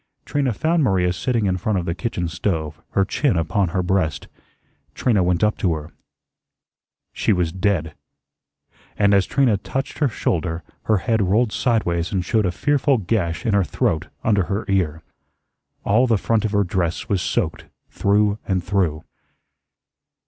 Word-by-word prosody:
Trina 140 -3 0
found 160 - +1
Maria 90 -6 +2
sitting 115 +2 -1
in 95 -1 +1
front 100 +3 -1
of 90 - -2
the 85 - -1
kitchen 90 -3 -3
stove, 80 -3 -3
her 95 - +3
chin 125 - +1
upon 95 +4 +1
her 90 +2 -1
breast. 90 -5 0 0.7
Trina 110 -6 +2
went 90 0 +1
up 105 0 +1
to 85 -4 +1
her. 75 +1 -8 1.2
She - - 0
was 90 -4 +1
dead. 90 -4 -1 1.0
And 100 0 +4
as 100 -2 +3
Trina 130 -7 +2
touched 135 +7 -4
her 145 - +3
shoulder, 85 -5 -2 0.2
her 110 - +3
head 110 +3 0
rolled 105 +4 +2
sideways 90 -9 0
and 95 -3 -1
showed 110 0 +1
a - - 0
fearful 145 +5 +2
gash 90 -5 -1
in 110 - +1
her 100 -1 +4
throat 80 -2 -1 0.2
under 100 -4 +2
her 100 +5 -2
ear. 85 -5 0 0.8
All 120 +6 +3
the 115 -3 +3
front 110 +2 0
of 105 - -1
her 100 -1 +2
dress 90 -2 -2
was 100 -3 0
soaked - - -2 0.3
through 105 +1 +2
and 95 -3 0
through. 85 -5 0
95 Hz, 165 wpm, -21 LUFS, 85-110 Hz, 1.2 s, And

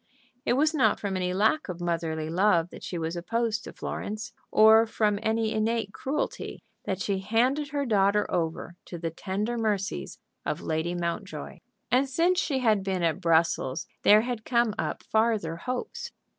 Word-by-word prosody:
It - - +3
was 305 +5 +3
not 285 -4 +3
from 200 -2 -2
any 180 -1 -1
lack 210 +8 +2
of 180 -1 -5
motherly 165 -2 -2
love 175 0 +2
that - - -11
she 175 - -4
was 165 +1 -3
opposed 225 +5 -1
to - - -7
Florence, 215 +3 -5 0.2
or 220 +1 +6
from 210 -2 +1
any 220 0 +1
innate 220 -2 0
cruelty 285 +3 -3 0.2
that 190 -1 -2
she 200 -1 -1
handed 250 +9 +1
her 285 0 -2
daughter 205 -2 +3
over 165 0 -2
to 175 - -7
the 165 -1 -3
tender 210 +7 -3
mercies 210 -2 -2 0.3
of - - -2
Lady 160 +2 -2
Mountjoy. 170 -2 -4 0.3
And 265 +3 +3
since 345 +7 +2
she 285 -8 0
had 215 -4 +3
been 190 -2 -1
at 165 +3 +1
Brussels 165 -4 +2 0.2
there 210 +1 +7
had 240 -2 -4
come 235 -3 +2
up - - -2
farther 220 -7 +1
hopes. 250 - -4
210 Hz, 170 wpm, -27 LUFS, 175-230 Hz, 0.3 s, there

